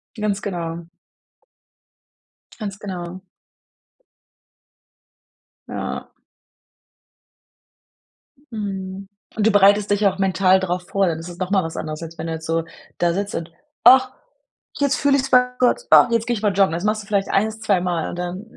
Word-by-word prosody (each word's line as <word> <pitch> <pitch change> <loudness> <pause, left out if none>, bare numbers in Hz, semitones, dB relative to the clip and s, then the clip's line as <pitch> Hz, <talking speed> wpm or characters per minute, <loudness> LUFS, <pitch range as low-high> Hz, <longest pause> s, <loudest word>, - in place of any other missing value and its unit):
Ganz 210 -2 -2
genau. 170 -3 -5 1.7
Ganz 200 -2 -5
genau. 185 -2 -6 2.5
Ja. - - -5 2.4
Mhm, 195 -3 -5 0.3
und 215 0 +2
du - - +4
bereitest 205 0 +4
dich 205 +1 +2
auch 190 - -1
mental 190 0 +3
drauf 180 -1 -2
vor, 195 -1 +1
dann 165 - -1
es 165 - -8
ist 175 - -11
noch 185 0 -3
mal 195 -2 +3
was 165 0 -6
anderes, 155 +1 -5
als 165 0 -9
wenn 165 - -5
du 165 - -3
jetzt 160 0 -7
so 165 0 0 0.3
da 170 -1 +1
sitzt 200 +3 -3
und: 165 0 -4 0.4
„Ach, 260 0 +7 0.7
jetzt 280 -2 +1
fühle 280 0 +3
ich's 270 0 -2
bei 250 0 +5
Gott. 255 - +2
Ach, - - +7
jetzt 230 -1 0
gehe 240 - +1
ich 205 - -5
mal 210 -2 +2
joggen." 190 -4 +3
Das 175 +3 -3
machst 215 +1 0
du 200 - -18
vielleicht 200 -2 0
1, 220 +2 0
2 200 -4 +2
Mal 175 -3 -2
und 175 - -7
dann 180 +3 -4
195 Hz, 160 wpm, -21 LUFS, 175-210 Hz, 2.5 s, Ach